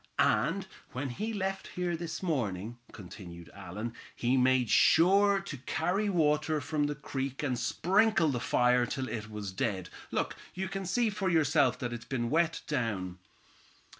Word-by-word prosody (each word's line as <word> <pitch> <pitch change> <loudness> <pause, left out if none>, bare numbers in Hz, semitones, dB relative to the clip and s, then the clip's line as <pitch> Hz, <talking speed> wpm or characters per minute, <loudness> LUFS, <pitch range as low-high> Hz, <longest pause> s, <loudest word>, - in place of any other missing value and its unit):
"And - - +2 0.3
when 130 +2 -3
he 215 - -3
left 195 -2 -2
here 175 -1 0
this 165 +1 -5
morning," 120 - -2
continued 90 -4 -10
Allan, 100 +4 -6 0.2
"he 120 +2 +1
made 130 -1 +3
sure 195 +4 +5
to 175 -7 -7
carry 180 - 0
water 155 -3 +2
from 145 +1 -1
the 145 0 -2
creek 135 -1 -4
and 130 -4 0
sprinkle 180 - +2
the 125 -4 -1
fire 125 0 +3
till 130 0 -3
it 110 -3 -5
was 105 -2 -5
dead. 95 -1 -2 0.2
Look, - - -1 0.2
you 190 +1 -2
can 195 -1 -4
see 225 +4 +2
for 195 -2 -1
yourself 160 -3 +3
that 120 -2 -3
it's 120 0 -7
been 120 -3 -2
wet 165 0 +2
down." 100 -10 -2
145 Hz, 160 wpm, -31 LUFS, 120-175 Hz, 0.3 s, sure